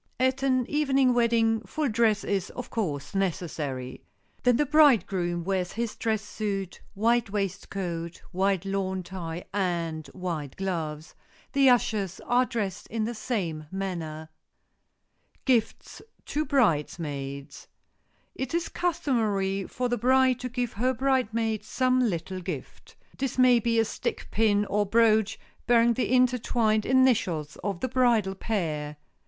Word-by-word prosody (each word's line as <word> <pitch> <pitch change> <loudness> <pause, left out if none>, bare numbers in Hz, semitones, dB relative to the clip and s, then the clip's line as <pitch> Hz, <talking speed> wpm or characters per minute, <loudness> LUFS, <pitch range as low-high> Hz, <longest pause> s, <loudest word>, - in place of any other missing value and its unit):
At 260 +1 +2
an 255 -2 +2
evening 275 -4 +2
wedding 230 -2 +2
full 300 +6 -2
dress 220 -3 +2
is, 195 -2 -1
of 250 0 -8
course, 155 -10 -3
necessary. 155 -9 -3 0.4
Then 245 -2 +4
the 295 - +2
bridegroom 205 - +3
wears 185 -1 -1
his 235 -1 -3
dress 220 -2 -1
suit, 200 -3 -4
white 230 +2 +2
waistcoat, 190 -4 -3
white 190 0 +1
lawn 190 -1 -2
tie 175 -2 -6
and 170 -5 -1
white 160 -4 -5
gloves. 160 -5 -4 0.4
The 275 -2 +5
ushers 210 -6 +1
are 245 +1 +2
dressed 205 -5 -3
in 225 -1 -2
the 230 +2 -2
same 180 -10 -3
manner. 165 -5 -4 1.0
[Sidenote: - - -37
GIFTS 245 -5 0 0.2
TO 305 +1 -1
BRIDESMAIDS] 145 - -1 0.7
It 265 +4 -4
is 340 - -1
customary 215 - 0
for 250 +1 -2
the 245 -1 -1
bride 260 +1 +4
to 250 - -4
give 245 -1 -2
her 255 +5 0
bridesmaids 230 -4 0
some 255 -1 +2
little 185 +1 -4
gift. 175 -7 -7 0.2
This 270 -2 -2
may 250 -1 +6
be 230 0 0
a 225 - +4
stick - - -4
pin 210 -1 +2
or 205 +1 +1
brooch 220 0 +3 0.3
bearing 235 -1 +5
the 250 - -1
intertwined 240 -4 +2
initials 220 - +2
of 195 -3 -3
the - - 0
bridal 235 -6 +2
pair. 155 -8 -3
215 Hz, 135 wpm, -27 LUFS, 180-245 Hz, 1.0 s, may